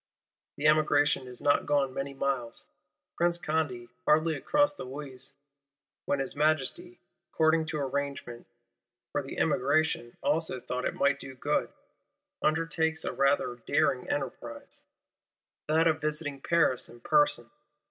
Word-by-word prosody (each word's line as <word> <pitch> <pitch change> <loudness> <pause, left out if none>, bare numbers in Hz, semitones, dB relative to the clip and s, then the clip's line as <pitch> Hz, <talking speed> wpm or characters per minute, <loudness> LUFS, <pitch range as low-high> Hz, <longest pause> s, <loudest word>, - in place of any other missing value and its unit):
The 145 - -3
Emigration 150 -3 +3
is 125 -1 -9
not 145 0 +3
gone 140 -3 +2
many 140 +1 -4
miles, 135 -4 -2 0.5
Prince 170 0 +2
Condé 150 -8 -2 0.2
hardly 160 +1 +4
across 290 - +2
the 290 - -8
Oise, 135 -1 -8 0.7
when 140 - +1
his 135 -1 -2
Majesty, 155 - 0 0.3
according 160 0 +3
to 160 -2 -3
arrangement, 140 -3 -4 0.6
for 145 - 0
the 135 - -8
Emigration 145 -3 +1
also 150 -2 0
thought 125 +1 -4
it - - -1
might 140 0 +2
do 135 -1 -9
good,—undertakes 165 - -2
a - - -2
rather 140 -3 +1
daring 125 -1 +1
enterprise: 120 -4 -5 0.8
that 160 +2 +3
of 160 -1 +2
visiting 150 -2 -3
Paris 160 -7 +2
in 120 - -14
person. 295 - +2
145 Hz, 125 wpm, -29 LUFS, 135-160 Hz, 0.8 s, hardly